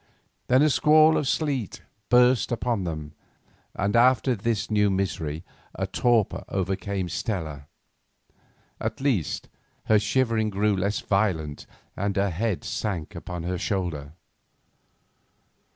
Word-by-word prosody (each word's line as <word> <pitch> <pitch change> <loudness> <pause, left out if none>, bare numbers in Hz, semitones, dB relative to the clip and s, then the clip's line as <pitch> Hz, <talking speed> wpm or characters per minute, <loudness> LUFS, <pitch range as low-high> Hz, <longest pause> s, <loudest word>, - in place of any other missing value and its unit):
Then 130 +3 +5
a 155 - +4
squall 155 +2 +5
of 150 - 0
sleet 135 - -1 0.3
burst 125 0 +4
upon 120 -4 -1
them, 75 -3 -5 0.6
and 100 +2 0
after 125 +2 +4
this 110 +1 -2
new 105 -1 +3
misery 90 -5 -2 0.3
a 95 - -1
torpor 115 +2 +1
overcame 95 0 -2
Stella; 80 - -4 1.1
at - - -3
least, 130 - -1 0.4
her 110 -1 +4
shiverings 115 -2 +1
grew 105 +1 +2
less 100 +3 -1
violent, 90 -8 -1 0.3
and 100 0 -2
her 100 -1 +1
head 100 +2 -2
sank 90 -8 -3
upon 90 -2 -6
his 90 0 -3
shoulder. 80 -7 -3
100 Hz, 120 wpm, -25 LUFS, 90-120 Hz, 1.1 s, Then